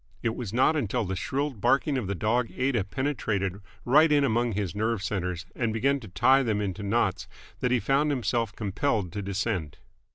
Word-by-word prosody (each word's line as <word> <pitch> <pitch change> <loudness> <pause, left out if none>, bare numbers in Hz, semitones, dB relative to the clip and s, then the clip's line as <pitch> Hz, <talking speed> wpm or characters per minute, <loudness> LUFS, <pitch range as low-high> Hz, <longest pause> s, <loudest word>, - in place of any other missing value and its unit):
It 115 -1 0
was 115 -6 -5
not 130 +7 +3
until 120 -4 -1
the 95 0 -3
shrill 140 +9 -1
barking 135 +5 +1
of 125 -7 -2
the 100 - -2
dog 115 +5 0
Aida 125 -6 +1
penetrated 105 -6 -2 0.2
right 150 +5 +5
in 145 -1 +4
among 120 -2 +1
his 100 -3 -2
nerve 110 0 -1
centres 90 -2 -3
and 120 -3 0
began 135 +6 +1
to 115 - -11
tie 130 +9 +4
them 110 -5 0
into 100 0 -3
knots 100 -2 0 0.3
that 125 - 0
he 125 0 +2
found 140 +5 +2
himself 120 -5 0
compelled 105 -2 -1
to 105 - -4
descend. 100 -5 -2
115 Hz, 190 wpm, -27 LUFS, 100-130 Hz, 0.3 s, right